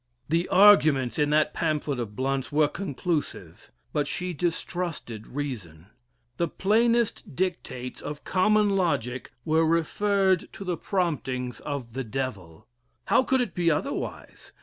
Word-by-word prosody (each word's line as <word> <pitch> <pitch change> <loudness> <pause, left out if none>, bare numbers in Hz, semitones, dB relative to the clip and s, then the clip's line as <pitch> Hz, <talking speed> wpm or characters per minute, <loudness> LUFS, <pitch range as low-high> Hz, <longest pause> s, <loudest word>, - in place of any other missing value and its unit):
The 170 +3 +1
arguments 155 - +5
in 150 0 +3
that 150 0 +2
pamphlet 150 -5 -1
of 110 -3 -5
Blount's 135 +1 -1
were 150 0 +4
conclusive, 170 -1 -4 0.2
but 145 -1 0
she 180 +4 -3
distrusted 165 - -3
reason. 105 - -6 0.5
The 170 - +1
plainest 230 - +1
dictates 130 -9 -3
of 150 0 -6
common 210 +2 +3
logic 130 - -1
were 160 +1 +3
referred 190 +3 +2
to - - -7
the 180 -2 -1
promptings 130 - -2
of 135 -6 -5
the 135 +1 -3
Devil. 110 -10 -5 0.4
How - - +4
could 260 0 +2
it 240 -6 -2
be 175 -1 +2
otherwise? 150 - -4
155 Hz, 130 wpm, -26 LUFS, 130-185 Hz, 0.5 s, arguments